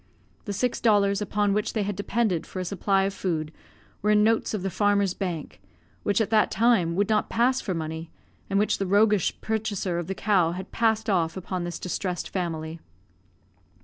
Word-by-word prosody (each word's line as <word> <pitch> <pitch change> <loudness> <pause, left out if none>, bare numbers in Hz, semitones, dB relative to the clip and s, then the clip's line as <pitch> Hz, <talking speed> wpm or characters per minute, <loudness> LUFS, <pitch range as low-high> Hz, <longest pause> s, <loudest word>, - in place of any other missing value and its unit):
The 205 - -3
six 245 +5 -1
dollars 205 -2 +3
upon 205 -1 +1
which 210 +1 -1
they 215 - 0
had 200 0 -3
depended 200 -3 -1
for 185 - -6
a 185 - -3
supply 195 +1 +1
of 195 0 -1
food 160 -6 -2 0.5
were 210 - +1
in 210 0 +5
notes 225 +1 +2
of 195 - -4
the 195 - -2
Farmer's 200 -2 +2
Bank, 175 -6 -5 0.4
which 205 - +1
at 220 -1 0
that 215 -1 +4
time 215 -8 +2
would 200 +2 +2
not 215 -1 +1
pass 255 +3 +2
for 185 - -3
money, 160 0 -5 0.4
and 195 - +1
which 210 +1 +2
the 195 - -1
roguish 205 -1 +3
purchaser 205 -5 -2
of 170 - -5
the 195 - -3
cow 185 -6 +2
had 190 +2 -7
passed 220 -1 +1
off 175 -4 +1
upon 185 -1 -4
this 175 - -4
distressed 180 0 -3
family. 165 -3 -3
200 Hz, 190 wpm, -26 LUFS, 180-210 Hz, 0.5 s, in